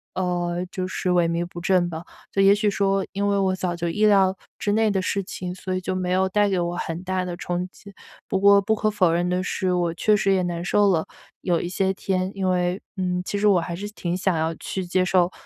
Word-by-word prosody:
呃， 175 -1 -1
就 185 -1 -3
是 185 0 -3
萎 175 -1 +3
靡 170 +1 -1
不 175 0 -9
振 180 0 +2
吧， 160 0 -6 0.3
就 195 - +1
也 195 0 +7
许 210 0 +1
说 195 -1 +1
因 200 +1 0
为 200 0 +2
我 190 -1 +1
早 180 -2 -2
就 170 0 -3
意 210 +5 +1
料 195 -2 +4 0.2
之 205 - 0
内 220 0 +3
的 195 -1 0
事 195 +1 -1
情， 180 -1 -6
所 185 0 -5
以 - - 0
就 185 +1 -3
没 185 -1 -2
有 190 +1 +2
带 205 +1 +2
给 190 -2 0
我 175 0 -2
很 165 -1 -4
大 185 0 -1
的 175 -1 -5
冲 175 +1 -3
击。 200 +1 -15 0.3
不 190 - 0
过 200 0 +6
不 220 +3 +1
可 215 0 0
否 190 -5 +2
认 175 +1 0
的 180 +1 0
是， 185 0 -1
我 175 -2 0
确 210 +5 +2
实 195 -1 +2
也 190 - +2
难 175 -1 -3
受 205 +3 +3
了 160 -3 0 0.3
有 175 -2 +1
一 175 - -4
些 190 +1 0
天， 185 -1 -2
因 190 -1 0
为 180 +1 0 0.2
嗯， 180 -1 -1
其 205 - -2
实 210 - +3
我 195 -3 +5
还 170 +1 -4
是 200 +4 -5
挺 175 -3 -3
想 185 -2 +1
要 160 +1 0
去 190 +4 -4
接 185 +1 +1
受， 180 -1 +2
185 Hz, 270 characters per minute, -23 LUFS, 175-195 Hz, 0.3 s, 也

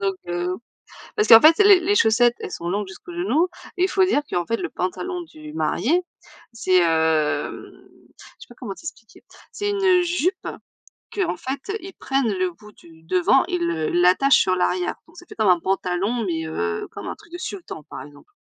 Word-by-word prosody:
Donc, 195 -1 0
heu 175 +1 -2 0.6
parce 425 - +1
qu'en 225 - +10
fait 320 +1 +7
les 400 -3 +7
les 395 +4 +1
chaussettes, 240 - +4
elles - - -7
sont 170 0 -5
longues 200 +1 -2
jusqu'aux 325 - -11
genoux 350 0 +1 0.3
et 360 - +2
il - - +4
faut 380 0 +3
dire 295 -6 +2
qu'en 175 -1 -1
fait 230 - 0
le - - -4
pantalon 355 - -4
du 155 - -12
marié, 200 - +1 0.5
c'est, 185 -5 +2
hem 160 -3 +1 0.5
je - - -14
sais - - -13
pas 240 - -14
comment 215 -7 -6
t'expliquer. 230 -4 -11 0.3
C'est 410 0 -3
une 380 -3 +3
jupe 360 +2 -1 0.7
qu'en 370 - -1
fait 275 - -5
ils 380 0 -10
prennent 270 -5 -1
le 185 -1 -1
bout 210 +5 -16
du 165 -1 -19
devant, 180 +2 +3
il 170 -1 -1
le 160 -2 -1
l'attachent 180 +10 +4
sur 185 - +2
l'arrière. 180 0 0
Donc 335 - -20
ça 350 - -13
fait - - -12
comme 215 -3 +1
un 180 -1 +5
pantalon, 195 +5 -1
mais, 160 -3 -2
heu, 85 - -3
comme - - -7
un - - -5
truc 340 - -20
de 350 - -6
sultan 360 - -7
par - - -9
exemple. 145 - -16
210 Hz, 200 wpm, -22 LUFS, -, 0.7 s, qu'en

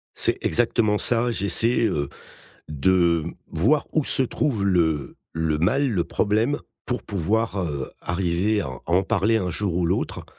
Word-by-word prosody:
C'est - - 0
exactement 115 -3 +2
ça. 120 +2 +1
J'essaie, 110 +3 +1
heu, 75 -9 -1 0.6
de 85 +2 +2 0.3
voir 135 - +2
où 155 - +1
se 135 - +4
trouve 125 -4 -1
le 80 -7 +1 0.2
le 80 -2 0
mal, 135 - +2
le 90 -6 0
problème 110 +7 0 0.3
pour 125 -1 -2
pouvoir, 105 +2 -1
heu, 70 -6 -4
arriver 90 +4 0
à - - -3
à 65 -1 -7
en 90 +3 +3
parler 100 +4 +1
un 95 -5 -1
jour 90 +1 -1
ou 90 -1 +1
l'autre, - - -2
95 Hz, 155 wpm, -23 LUFS, 85-115 Hz, 0.6 s, se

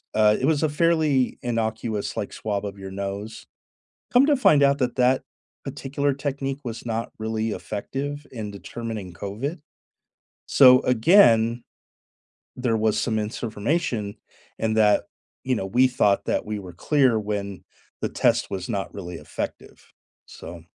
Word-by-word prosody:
uh, 105 0 +5
it - - 0
was 155 +1 +2
a 155 - +2
fairly 155 -4 +2
innocuous, 110 -2 -2
like, - - -3
swab 105 -1 -3
of 100 0 -6
your 95 0 -7
nose. 100 +3 -5 0.7
Come 250 +3 +6
to 295 - +4
find 150 - +5
out 140 +1 +3
that 125 -2 0
that 130 +1 +3 0.4
particular 140 0 -2
technique 135 0 -3
was 115 -3 -6
not 115 0 -3
really 110 0 -2
effective 140 +9 -5
in 110 -4 -5
determining 105 -2 -6
COVID. 110 - -5 0.9
So, 130 -1 +7
again, 120 - +5 0.9
there 125 -3 0
was 110 -1 +1
some 110 -3 0
misinformation, 110 +1 -2 0.4
and 110 0 0
that, 105 -1 +4 0.4
you 130 -1 0
know, 95 - -3
we 125 +6 +4
thought 105 -6 +2
that - - -1
we 105 0 -3
were 90 -3 -10
clear 130 - +2
when 100 -2 -4 0.4
the - - -1
test - - +1
was 95 -2 -4
not 100 -1 -3
really 90 -3 -7
effective, - - -7 0.3
so 85 0 -10
115 Hz, 145 wpm, -24 LUFS, 105-135 Hz, 0.9 s, So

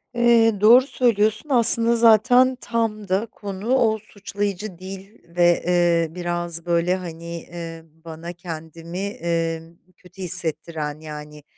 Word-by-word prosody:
Eee, 235 -2 +3
doğru 245 +5 +6
söylüyorsun. 220 +2 0
Aslında 235 -2 +5
zaten 245 +3 +4
tam 225 -3 -3
da 190 +4 0
konu, 205 +2 -4
o 225 -4 +2
suçlayıcı 205 -2 -6
dil 190 +2 -10 0.2
ve, 175 -1 +3
eee, 175 -2 +2
biraz, 175 -1 -3
böyle, 170 +1 +1
hani, 170 -2 -8
eee, 165 -1 -9 0.2
bana 165 +1 -8
kendimi, 165 0 -9
eee, 170 -6 -3 0.4
kötü 185 +1 -16
hissettiren, 155 -3 0
yani 150 -1 -10
185 Hz, 120 wpm, -21 LUFS, 170-220 Hz, 0.4 s, doğru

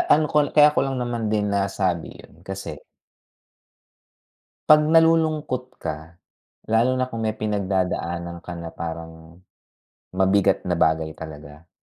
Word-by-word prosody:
ano 155 +1 +1
ko 150 - +2 0.2
kaya 150 0 +7
ko - - 0
lang 135 0 -2
naman 120 -2 -2
din 105 -1 0
nasabi 95 -4 -1
yun - - -16
kasi - - -6 1.9
'pag 150 0 +7
nalulungkot 160 -5 +3 0.2
ka, 75 - -2 0.8
lalo 115 +3 +4
na 130 0 0
kung 115 -2 -5
may 110 0 -1
pinagdadaanan 90 -4 -2
ka 90 - -6
na 85 -1 -6
parang, 80 0 -6 1.0
mabigat 95 0 +2
na 90 - 0
bagay 80 -1 +1
talaga. 80 0 -11
100 Hz, 125 wpm, -23 LUFS, 85-125 Hz, 1.9 s, kaya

